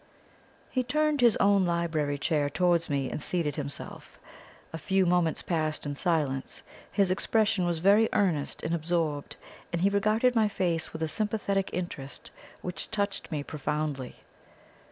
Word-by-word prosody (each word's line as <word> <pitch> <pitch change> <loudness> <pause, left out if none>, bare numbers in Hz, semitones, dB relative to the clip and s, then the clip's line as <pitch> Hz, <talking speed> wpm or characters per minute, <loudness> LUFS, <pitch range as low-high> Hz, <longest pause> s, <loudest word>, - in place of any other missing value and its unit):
He 255 - +1
turned 300 +3 +1
his 235 -3 +6
own 200 -1 +4
library 165 -4 0
chair 145 -1 0
towards 175 +1 +2
me, 140 -2 -1
and - - -4
seated 155 -3 -1
himself. 140 -2 -5 0.6
A 160 - -4
few 190 +3 +2
moments 175 -2 +1
passed 155 -3 -1
in 145 - -2
silence; 145 -4 -1 0.3
his 195 -3 +2
expression 205 -1 +1
was 170 -1 0
very 200 +6 +4
earnest 165 -8 0
and 160 - -1
absorbed, 160 -3 -1 0.4
and 170 0 -1
he 200 - +5
regarded 215 +5 +2
my 225 -3 +3
face 175 -5 -1
with 160 - -4
a - - +1
sympathetic 200 +2 -1
interest 165 -6 -6 0.3
which 180 -2 -4
touched 200 -2 -2
me 150 -2 -2
profoundly. 150 -3 -3
170 Hz, 150 wpm, -28 LUFS, 150-200 Hz, 0.6 s, his